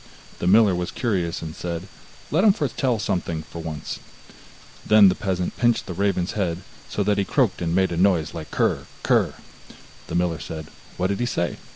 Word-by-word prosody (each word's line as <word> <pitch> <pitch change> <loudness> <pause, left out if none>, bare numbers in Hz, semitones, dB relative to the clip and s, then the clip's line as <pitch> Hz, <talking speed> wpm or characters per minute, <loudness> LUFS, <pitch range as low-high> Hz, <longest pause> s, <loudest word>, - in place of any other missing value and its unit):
The 85 - -1
miller 105 0 +6
was 90 0 -2
curious, 90 -9 -1
and 80 -1 -6
said: 85 +1 -4 0.4
'Let 165 +6 +3
him 210 -3 +7
foretell 130 - 0
something 85 -5 -2
for 85 +2 -8
once.' 80 -2 -5 0.8
Then 105 -2 +7
the - - +2
peasant 90 -2 -2
pinched 120 -1 +2
the 90 - -5
raven's 95 -1 0
head, 90 -4 -2 0.3
so 105 - -1
that 105 0 +1
he - - +3
croaked - - +1
and 85 0 0
made 95 -1 +3
a 85 - -2
noise 90 -4 +2
like 80 -2 -7
krr, - - 0 0.2
krr. - - +2 0.7
The - - -4
miller 85 -2 +1
said: 80 -1 -7 0.3
'What 90 - 0
did 100 - -1
he 120 - 0
say? 85 -7 -1
90 Hz, 190 wpm, -24 LUFS, 85-105 Hz, 0.8 s, him